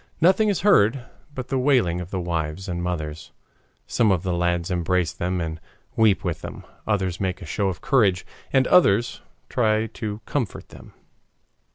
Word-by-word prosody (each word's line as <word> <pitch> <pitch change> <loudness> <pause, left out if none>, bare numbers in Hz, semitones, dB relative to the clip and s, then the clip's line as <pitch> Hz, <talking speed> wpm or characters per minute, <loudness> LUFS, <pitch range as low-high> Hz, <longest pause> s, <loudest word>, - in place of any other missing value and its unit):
Nothing 190 +6 +4
is 200 - 0
heard 125 - +4 0.3
but 130 -1 -6
the 135 - 0
wailing 120 -11 +2
of 90 - -8
the 95 - -3
wives 85 0 -3
and 85 -1 -3
mothers. 80 -3 -4 0.5
Some 110 -4 +2
of 90 -2 +1
the 90 -2 -1
lads 85 0 0
embrace 90 -1 0
them 90 +1 -2
and 80 -1 -4 0.3
weep 110 -3 +3
with 85 -5 -3
them, - - -8 0.2
others 95 -5 0
make 95 -1 -1
a 95 - -9
show 100 +6 -1
of 90 -1 -3
courage, 100 -10 +2 0.3
and 130 -1 +4
others 120 - +3 0.3
try 110 -2 +1
to 110 -1 -5
comfort 125 -9 -3
them. - - -14
95 Hz, 170 wpm, -23 LUFS, 85-115 Hz, 0.5 s, Nothing